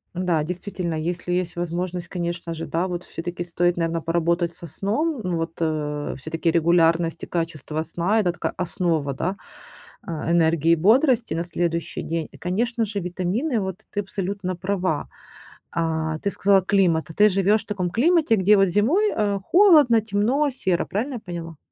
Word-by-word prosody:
Да, 175 -4 +1
действительно, 180 0 -4
если 175 +3 -3
есть 180 -1 -1
возможность, 175 +1 -3
конечно 170 -1 -4
же, 165 - -5
да, 170 +3 -1
вот 180 -1 -4
всё-таки 175 0 -5
стоит, 175 0 0
наверно, 165 -1 -1
поработать 170 +1 0
со 170 - -10
сном. 235 - -2
Ну 180 -2 -1
вот, 165 0 -3
э, 150 -2 -2
всё-таки 165 +4 -2
регулярность 165 0 +2
и - - -5
качество 160 -2 -3
сна- 175 +7 0
это 180 -5 +2
такая - - -3
основа, 165 -5 -1
да, 180 +8 -2 0.7
а, 165 -1 -4
энергии 165 -1 +3
и - - +6
бодрости 235 - +3
на 170 - -1
следующий 170 -1 -2
день. 165 -1 -3
И, - - -14
конечно 225 +6 -1
же, 205 -1 -4
витамины. 190 - -1
Вот 190 0 -4
ты 205 - -2
абсолютно 195 -1 -4
права. 185 -4 -2 0.6
А. 160 -1 -1
Ты 200 - -1
сказала 195 0 +3
климат, 180 -4 +2
а - - -8
ты 210 +4 +6
живешь 200 +2 +2
в - - -33
таком 185 -4 -2
климате, 290 - +3
где 205 +2 +5
вот 195 - +5
зимой, 270 - +2
э, 205 -2 0
холодно, 310 - +6
темно, 225 +8 +1
серо. 190 -9 0
Правильно 245 +8 -3
я 240 - -5
поняла? 170 -5 -7
180 Hz, 170 wpm, -23 LUFS, 165-205 Hz, 0.7 s, и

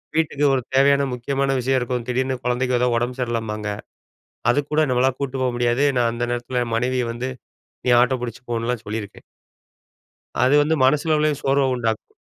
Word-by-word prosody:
வீட்டுக்கு 150 -2 +1
ஒரு 130 - +1
தேவையான 140 +1 +4
முக்கியமான 135 +2 -1
விஷயம் 130 +1 +1
இருக்கும் 125 -1 -3
திடீர்னு 130 0 -1
குழந்தைக்கு 125 0 0
ஏதாவது 125 -1 +2
உடம்பு 120 +2 -2
சரியில்லம்பாங்க. 115 -3 -3 0.9
அதுக்கூட 145 +3 0
நம்மளால 125 +1 +3
கூட்டு 135 -1 -3
போ 130 - +2
முடியாது 120 +3 +2
நான் 120 -1 +2
அந்த 120 +1 -2
நேரத்தில 120 +1 -2
என் 115 -1 -3
மனைவிய 125 +1 0
வந்து, 125 +2 -4 0.6
"நீ 125 - +3
ஆட்டோ 130 +1 +2
புடிச்சு 120 +1 -6
போன்லாம்" 115 0 -2
சொல்லியிருக்கேன். 105 -1 -6 1.2
அது 130 +3 +4
வந்து 155 +2 +2
மனசு 145 +4 +3
அளவுலயும் 150 -2 +1
சோர்வ 135 0 +2
உண்டாக்கும். 115 -3 -3
125 Hz, 160 wpm, -22 LUFS, 120-135 Hz, 1.2 s, தேவையான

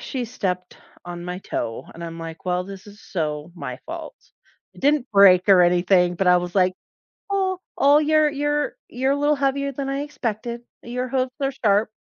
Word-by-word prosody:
she 255 -2 -4
stepped 185 -6 -4 0.3
on 175 0 -7
my 180 0 -4
toe 115 -10 -4
and 170 - -10
I'm 165 0 -7
like, 165 -1 -8
"Well, 180 0 0
this 195 +1 -10
is 205 +1 -14
so 155 -3 -3
my - - -6
fault." - - -7 0.6
It - - -14
didn't 285 -2 +2
break 195 -2 +6
or 190 -2 +7
anything, 180 0 +3
but 195 - 0
I 180 - +7
was 175 0 -5
like, 185 -2 +3 0.6
"Oh, 380 -2 0 0.2
oh, 285 +1 +6
you're 310 0 +3
you're 295 +1 -1
you're 265 +2 0
a - - -1
little 295 +1 +3
heavier 280 0 0
than 275 0 -4
I 275 +1 -2
expected. 235 -4 -4 0.2
Your 250 +2 -3
hooves 255 0 0
are 275 0 +1
sharp." 215 -5 +2
215 Hz, 190 wpm, -23 LUFS, 180-275 Hz, 0.6 s, or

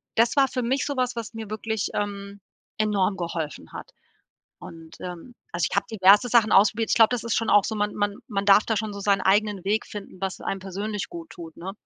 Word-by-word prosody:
das 230 +4 +3
war 270 - +5
für 255 -1 -3
mich 260 +4 0
sowas, 255 -4 -1
was 230 -1 -6
mir 220 -2 -7
wirklich, 220 0 -3
ähm, 200 -1 -4 0.4
enorm 205 -2 +1
geholfen 165 -4 -5
hat. - - -9 0.7
Und, 165 -1 -12
ähm, 180 +7 -8 0.2
also - - 0
ich - - -3
hab - - +1
diverse 205 +2 +5
Sachen 230 -2 +4
ausprobiert. 210 +3 +4
Ich - - +2
glaub, 225 0 +6
das 245 -3 -2
ist 230 - -1
schon 225 - 0
auch 205 - +5
so, 220 - -3
man 210 0 -1
man 205 -1 -1
man 200 -4 -2
darf 205 +1 +6
da 220 - 0
schon 215 0 -2
so 200 - -7
seinen 200 -1 +2
eigenen 200 0 +1
Weg 210 +3 0
finden, 200 -3 -9
was 195 -1 -4
einem 195 - -3
persönlich 200 +2 -4
gut 335 -2 -9
tut, 165 -2 -11
ne? 185 +3 -6
210 Hz, 225 wpm, -25 LUFS, 195-225 Hz, 0.7 s, glaub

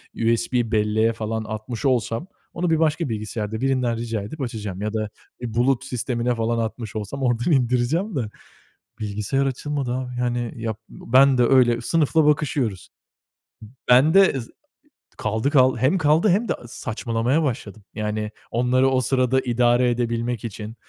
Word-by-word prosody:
USB 115 +1 0
belleğe 110 +1 +2
falan 110 0 -3
atmış 110 +4 -6
olsam, 125 - 0 0.3
onu 175 0 -1
bir 160 -1 +2
başka 160 -1 +1
bilgisayarda 110 0 -4
birinden 130 -3 +1
rica 115 -2 -3
edip 140 +10 -7
açacağım 105 -6 -5
ya 105 +1 -2
da 110 -1 -2 0.3
bir, 120 - -3
eee, 115 - -7
bulut 120 +2 +1
sistemine 120 0 -1
falan 115 +1 -1
atmış 115 -1 -4
olsam 110 +6 -4
oradan 120 +4 +1
indireceğim 135 - +1
de, 120 -6 -2 0.7
bilgisayar 105 +6 -1
açılmadı 135 -1 -2
abi. 130 -1 -4
Yani, 120 -1 -1
yap 110 -2 -4
ben 130 +2 +3
de - - +5
öyle 120 -2 +4
sınıfla 160 +4 +2
bakışıyoruz. 140 -9 0 1.0
Ben 130 +6 +6
de 190 -8 +5
z 115 - -10 0.7
Kaldı, 110 +5 0
kaldı, 130 -3 +4
hem 130 +10 +3
kaldı 160 +4 +3
hem 205 +6 +2
de - - +3
saçmalamaya 120 +4 -1
başladım. 110 -6 -4
Yani, 105 0 -3 0.2
onları 125 +3 +2
o 130 -1 +2
sırada 130 0 +2
idare 120 0 +2
edebilmek 120 -1 -2
için, 110 0 -7
120 Hz, 150 wpm, -23 LUFS, 110-135 Hz, 1.0 s, Ben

